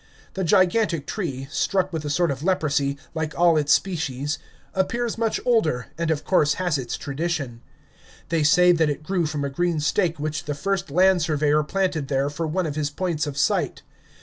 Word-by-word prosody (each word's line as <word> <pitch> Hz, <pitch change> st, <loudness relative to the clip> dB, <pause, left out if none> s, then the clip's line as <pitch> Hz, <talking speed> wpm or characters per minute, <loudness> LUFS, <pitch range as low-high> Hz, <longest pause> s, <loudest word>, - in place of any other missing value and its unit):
The 190 Hz, -, -2 dB
gigantic 185 Hz, -2 st, +2 dB
tree, 140 Hz, -11 st, -4 dB
struck 185 Hz, +3 st, 0 dB
with 160 Hz, -2 st, -3 dB
a -, -, -2 dB
sort 170 Hz, +1 st, +1 dB
of 135 Hz, 0 st, -5 dB
leprosy, 145 Hz, -6 st, 0 dB, 0.2 s
like 160 Hz, -1 st, -3 dB
all 170 Hz, -1 st, +5 dB
its 150 Hz, -2 st, +1 dB
species, 145 Hz, -5 st, 0 dB, 0.3 s
appears 235 Hz, +5 st, -1 dB
much 225 Hz, -1 st, 0 dB
older, 165 Hz, -, +1 dB
and 165 Hz, -1 st, -2 dB
of 155 Hz, -2 st, 0 dB
course 150 Hz, -6 st, +3 dB
has 175 Hz, -6 st, 0 dB
its 120 Hz, -2 st, -4 dB
tradition. 140 Hz, -4 st, -3 dB, 0.7 s
They 165 Hz, -1 st, +1 dB
say 180 Hz, +4 st, +5 dB
that 165 Hz, -3 st, +2 dB
it 145 Hz, +1 st, -3 dB
grew 175 Hz, -1 st, 0 dB
from 150 Hz, -2 st, -3 dB
a -, -, -2 dB
green 170 Hz, +2 st, 0 dB
stake 165 Hz, +2 st, 0 dB
which 155 Hz, +1 st, -3 dB
the 145 Hz, -, -3 dB
first 190 Hz, +1 st, -2 dB
land 185 Hz, +4 st, +4 dB
surveyor 150 Hz, -1 st, +2 dB
planted 180 Hz, -3 st, -1 dB
there 140 Hz, +1 st, 0 dB
for 160 Hz, +2 st, -3 dB
one 180 Hz, +3 st, -1 dB
of 150 Hz, -2 st, -3 dB
his 150 Hz, -2 st, -1 dB
points 160 Hz, -1 st, -2 dB
of 140 Hz, -1 st, -5 dB
sight. 135 Hz, -, 0 dB
160 Hz, 190 wpm, -24 LUFS, 145-180 Hz, 0.7 s, all